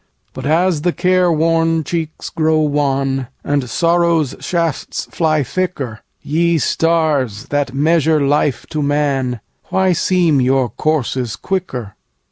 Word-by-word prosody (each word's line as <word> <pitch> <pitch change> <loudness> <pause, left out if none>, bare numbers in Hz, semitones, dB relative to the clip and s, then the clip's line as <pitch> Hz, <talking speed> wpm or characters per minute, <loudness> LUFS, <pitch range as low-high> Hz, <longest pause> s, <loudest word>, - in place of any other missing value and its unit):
But 130 +1 -5
as 165 0 +2
the 175 +2 0
care 180 0 +2
worn 165 0 +2
cheeks 160 -1 -4
grow 160 0 +1
wan, 135 -3 0 0.2
And 140 -3 -1
sorrow's 170 0 +2
shafts 165 -4 -2
fly 155 -3 +1
thicker, 135 -7 -3 0.2
Ye 170 +2 +1
Stars, 150 -9 0
that 145 -2 -1
measure 160 +1 +3
life 140 -3 +1
to 155 -2 -1
man, 140 -5 0 0.2
Why 190 -1 +1
seem 170 -5 +2
your 130 -1 +2
courses 130 -2 -1
quicker? 135 - -4
155 Hz, 120 wpm, -17 LUFS, 135-165 Hz, 0.2 s, measure